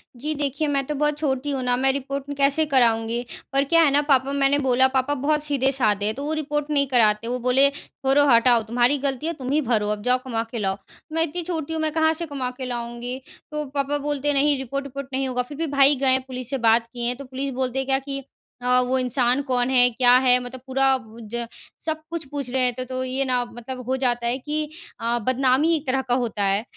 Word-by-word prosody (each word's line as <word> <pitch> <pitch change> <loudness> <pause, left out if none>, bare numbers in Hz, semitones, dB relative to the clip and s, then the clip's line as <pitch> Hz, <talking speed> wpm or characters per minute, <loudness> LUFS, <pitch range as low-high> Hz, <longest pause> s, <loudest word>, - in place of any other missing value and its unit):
जी 295 +6 -3
देखिए, 290 +1 -2
मैं 275 -1 0
तो 300 - -2
बहुत 295 +1 0
छोटी 280 -2 -1
हूँ 270 -2 -2
ना 250 0 +2
मैं 265 +1 +3
रिपोर्ट 275 +1 -4
कैसे 280 +3 +2
कराऊँगी। 235 -3 +2 0.3
पर 275 0 +3
क्या 330 +4 +4
है 300 - +4
ना 285 +1 +4
पापा 275 -2 +2
मैंने 280 0 +3
बोला 260 -1 +3
पापा 265 +2 0
बहुत 295 +2 0
सीधे-साधे 265 -8 0
हैं 215 - -1
तो 280 - -6
वो 305 - -1
रिपोर्ट 295 -1 -2
नहीं 280 -2 +1
कराते 230 -3 +2
वो 250 +1 -2
बोले 255 +3 +4
छोड़ो 275 0 0
हटाओ 235 -1 +5
तुम्हारी 240 +5 +2
गलती 275 +1 -2
है 335 - -1
तुम 265 -4 -5
ही 305 +2 +2
भरो 220 -5 0
अब 210 -1 -3
जाओ 250 +2 +3
कमा 230 -3 -1
के 235 - -4
लाओ। 195 -2 -1 0.4
मैं 325 0 +2
इतनी 335 +2 -3
छोटी 320 -2 -4
हूँ 320 - -2
मैं 310 - +1
कहाँ 320 0 +3
से 335 +1 -5
कमा 275 -5 -3
के 260 - -5
लाऊँगी। 240 +1 -5 0.3
तो 300 0 -3
पापा 280 +1 -2
बोलते 290 -1 -2
हैं 290 - +2
नहीं 285 +1 +3
रिपोर्ट 275 +2 -4
विपोर्ट 275 0 -7
नहीं 265 0 -1
होगा। 250 -1 -1
फिर 275 +3 -9
भी 325 0 -2
भाई 280 0 +4
गए 265 -1 +2
हैं 260 - +3
पुलिस 255 -1 -6
से 275 - -1
बात 230 -1 +3
किए 240 0 -1
तो 275 +2 -10
पुलिस 265 +2 -4
बोलते 260 0 -2
हैं 265 - -2
क्या 270 0 +2
कि 275 0 -6 0.4
अ, 250 0 +4
वो 255 +1 0
इंसान 250 +1 +1
कौन 250 -1 +1
है 250 -1 +5
क्या 245 +1 +3
है 250 -1 +4
मतलब 245 0 -9
पूरा 270 +1 +2 0.5
ज 235 0 -1 0.4
सब 315 -1 -1
कुछ 335 -1 -4
पूछ 280 -3 -4
रहे 260 +1 0
हैं, 250 0 0
तो 255 0 -4
ये 260 +1 -1
ना 250 -1 +1
मतलब 240 +2 -8
हो 260 - 0
जाता 240 -2 0
है 245 +2 0
कि 300 +2 -3 0.3
अ, 235 +1 0
बदनामी 265 +5 +3
एक 310 -1 -4
तरह 265 +1 +1
का 250 -2 -2
होता 230 -5 -1
है। 195 +2 +1
265 Hz, 240 wpm, -23 LUFS, 245-285 Hz, 0.5 s, हटाओ